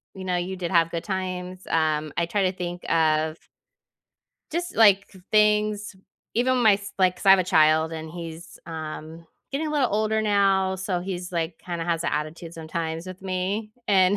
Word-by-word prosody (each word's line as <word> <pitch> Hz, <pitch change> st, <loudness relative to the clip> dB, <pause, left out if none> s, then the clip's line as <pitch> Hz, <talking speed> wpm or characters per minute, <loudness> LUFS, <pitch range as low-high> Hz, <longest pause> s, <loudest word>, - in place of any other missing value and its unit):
you 190 Hz, -1 st, -7 dB
know, 180 Hz, -1 st, 0 dB
you 180 Hz, +2 st, -3 dB
did 180 Hz, -2 st, -4 dB
have 165 Hz, -2 st, +3 dB
good 170 Hz, 0 st, -3 dB
times. 185 Hz, -1 st, -4 dB
Um, 155 Hz, -2 st, +1 dB
I 170 Hz, -, +2 dB
try 200 Hz, +3 st, 0 dB
to -, -, -17 dB
think 175 Hz, 0 st, -5 dB
of 155 Hz, -1 st, +2 dB, 1.1 s
just, 345 Hz, +2 st, -3 dB
like, 205 Hz, -3 st, +6 dB
k 190 Hz, -, -16 dB
things, 210 Hz, -1 st, +2 dB, 0.4 s
even 255 Hz, +2 st, +2 dB
my 215 Hz, -3 st, +7 dB
s 200 Hz, 0 st, -7 dB
like, 185 Hz, -1 st, +3 dB
'cause -, -, -9 dB
I -, -, +8 dB
have 195 Hz, -, +8 dB
a 185 Hz, -, +1 dB
child 160 Hz, -1 st, +4 dB
and 160 Hz, 0 st, -6 dB
he's, 165 Hz, 0 st, -8 dB
um, 160 Hz, 0 st, -7 dB, 0.2 s
getting 285 Hz, +3 st, -2 dB
a -, -, -2 dB
little 285 Hz, -7 st, +1 dB
older 220 Hz, +1 st, +1 dB
now. 195 Hz, -2 st, +3 dB
So, 185 Hz, -1 st, -2 dB
he's, 180 Hz, -1 st, -5 dB
like, 165 Hz, -1 st, -2 dB
kinda 170 Hz, -2 st, -4 dB
has 170 Hz, -1 st, -1 dB
a -, -, 0 dB
attitude 160 Hz, +2 st, -4 dB
sometimes 160 Hz, +1 st, -4 dB
with 185 Hz, 0 st, -9 dB
me, 195 Hz, +3 st, -2 dB, 0.2 s
and 190 Hz, 0 st, +5 dB
180 Hz, 190 wpm, -25 LUFS, 165-200 Hz, 1.1 s, I